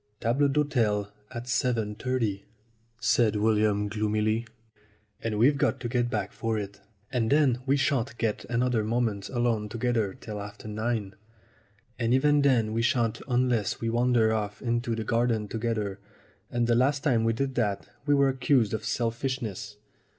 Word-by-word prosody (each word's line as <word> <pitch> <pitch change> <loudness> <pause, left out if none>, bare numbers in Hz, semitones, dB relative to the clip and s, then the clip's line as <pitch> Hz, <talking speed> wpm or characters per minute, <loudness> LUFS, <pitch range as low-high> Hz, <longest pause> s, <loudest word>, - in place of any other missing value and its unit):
"Table 130 +6 +2
d'hote 125 -8 +1 0.2
at 120 -1 -6
7.30," 115 -3 -1 0.6
said 115 -3 +3
William 105 -1 +2
gloomily, 110 +2 0 0.7
"and 110 -2 -2
we've 140 +6 +4
got 135 - +1
to 120 - -3
get 120 0 0
back 105 -4 -2
for 115 -1 -2
it. 100 -1 -6 0.3
And 120 -4 0
then 140 -4 +3
we 140 +2 +3
shan't 135 -2 0
get 110 -3 -1
another 120 -1 +1
moment 110 -3 -1
alone 120 -4 0
together 115 -3 -1
till 105 -3 -6
after 105 +1 -9
nine. 110 -2 -2 0.9
And 120 +1 +2
even 145 +2 +4
then 120 -6 +3
we 115 - +1
shan't 115 -1 +1
unless 125 -5 +1
we 115 0 -1
wander 120 -2 +3
off 105 -1 -3
into 120 -1 -1
the 110 - -3
garden 115 -1 +1
together, 110 -3 -2 0.5
and 120 -1 0
the 120 - +2
last 135 +4 +2
time 120 -7 +2
we 115 0 +2
did 135 +3 -2
that 105 -5 -1 0.2
we 145 - +5
were 140 -1 +4
accused 130 -4 +2
of 110 - -2
selfishness. 115 -3 -3
115 Hz, 155 wpm, -27 LUFS, 110-125 Hz, 0.9 s, we